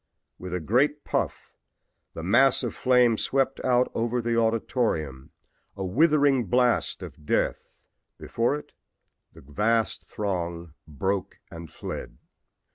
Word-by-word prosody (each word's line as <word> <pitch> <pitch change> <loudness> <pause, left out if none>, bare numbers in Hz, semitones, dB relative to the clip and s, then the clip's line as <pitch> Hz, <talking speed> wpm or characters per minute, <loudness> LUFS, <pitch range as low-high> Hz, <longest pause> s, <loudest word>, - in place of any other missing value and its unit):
With 90 -1 -7
a - - -1
great 135 - +1
puff - - -3 0.6
the 80 - -6
mass 120 +8 +4
of - - -2
flame 125 -3 +3
swept 135 0 0
out 125 -1 +2
over 120 +2 -1
the 120 0 -1
auditorium, 110 - -1 0.5
a 95 - -3
withering 140 - +3
blast 125 +5 +1
of 75 - -11
death. - - -1 0.4
Before 120 +5 -1
it 150 - -9 0.6
the - - -15
vast 105 +9 -1
throng 85 -5 -4
broke 95 +6 -3
and 85 -2 -9
fled. - - -7
115 Hz, 120 wpm, -26 LUFS, 85-125 Hz, 0.6 s, mass